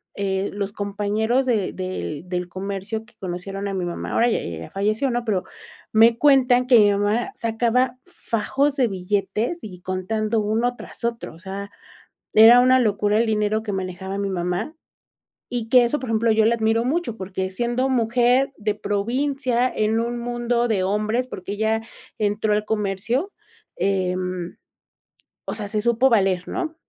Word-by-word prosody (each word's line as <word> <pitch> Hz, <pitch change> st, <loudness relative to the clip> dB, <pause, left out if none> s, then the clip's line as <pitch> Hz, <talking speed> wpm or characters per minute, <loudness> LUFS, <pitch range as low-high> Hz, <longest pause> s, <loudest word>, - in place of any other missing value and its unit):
eh, 195 Hz, 0 st, -1 dB
los 200 Hz, -1 st, -3 dB
compañeros 210 Hz, +5 st, 0 dB
de 220 Hz, -7 st, 0 dB
del 185 Hz, -3 st, -5 dB
del 180 Hz, -1 st, -2 dB
comercio 195 Hz, +4 st, -5 dB
que 235 Hz, -, -24 dB
conocieron 195 Hz, +2 st, -5 dB
a 200 Hz, -, -3 dB
mi 185 Hz, -2 st, -2 dB
mamá, 175 Hz, -, -5 dB
ahora 235 Hz, +1 st, +3 dB
ya -, -, +1 dB
ella 85 Hz, -2 st, -6 dB
ya 80 Hz, -, -8 dB
falleció, 215 Hz, +7 st, 0 dB
¿no? 240 Hz, 0 st, -2 dB
Pero 200 Hz, -5 st, 0 dB, 0.5 s
me 225 Hz, +1 st, +5 dB
cuentan 255 Hz, -3 st, +4 dB
que 250 Hz, -2 st, +6 dB
mi 205 Hz, -1 st, +6 dB
mamá 205 Hz, -, 0 dB
sacaba 240 Hz, +2 st, 0 dB
fajos 280 Hz, -3 st, -1 dB
de 255 Hz, -3 st, +3 dB
billetes 200 Hz, -, -2 dB
y 180 Hz, -4 st, -10 dB
contando 215 Hz, +5 st, -1 dB
uno 225 Hz, +4 st, 0 dB
tras -, -, -10 dB
otro. 235 Hz, -5 st, -3 dB
O -, -, -16 dB
sea, 195 Hz, +2 st, -6 dB, 0.6 s
era 225 Hz, +3 st, +9 dB
una 255 Hz, +1 st, +5 dB
locura 210 Hz, -2 st, +1 dB
el 230 Hz, -, +3 dB
dinero 215 Hz, 0 st, 0 dB
que 210 Hz, -2 st, -4 dB
manejaba 190 Hz, +1 st, -4 dB
mi 200 Hz, 0 st, -1 dB
mamá 180 Hz, -, -2 dB, 0.8 s
y 235 Hz, -2 st, -2 dB
que 250 Hz, 0 st, +7 dB
eso, 295 Hz, +5 st, -1 dB
por 255 Hz, -, -6 dB
ejemplo, 225 Hz, 0 st, +2 dB
yo 220 Hz, 0 st, +3 dB
la 230 Hz, +1 st, +4 dB
admiro 225 Hz, +1 st, +1 dB
mucho, 275 Hz, -4 st, -1 dB
porque 190 Hz, -1 st, -4 dB
siendo 240 Hz, +6 st, 0 dB
mujer 250 Hz, +2 st, +2 dB
de 210 Hz, 0 st, -1 dB
provincia, 250 Hz, +4 st, 0 dB
en 215 Hz, +1 st, +1 dB
un 235 Hz, +1 st, -2 dB
mundo 240 Hz, 0 st, 0 dB
de 200 Hz, -4 st, +1 dB
hombres, 215 Hz, +6 st, 0 dB
porque 195 Hz, -4 st, -6 dB
ella 220 Hz, +1 st, 0 dB, 0.4 s
entró 210 Hz, 0 st, +1 dB
al 210 Hz, 0 st, +1 dB
comercio. 220 Hz, -, -1 dB, 0.4 s
Em, 185 Hz, -2 st, -1 dB, 0.9 s
o -, -, -3 dB
sea, 210 Hz, -2 st, -4 dB
se 215 Hz, -, -1 dB
supo 235 Hz, +3 st, +3 dB
valer, 190 Hz, -6 st, +2 dB
¿no? 330 Hz, -3 st, -3 dB
220 Hz, 165 wpm, -22 LUFS, 195-240 Hz, 0.9 s, era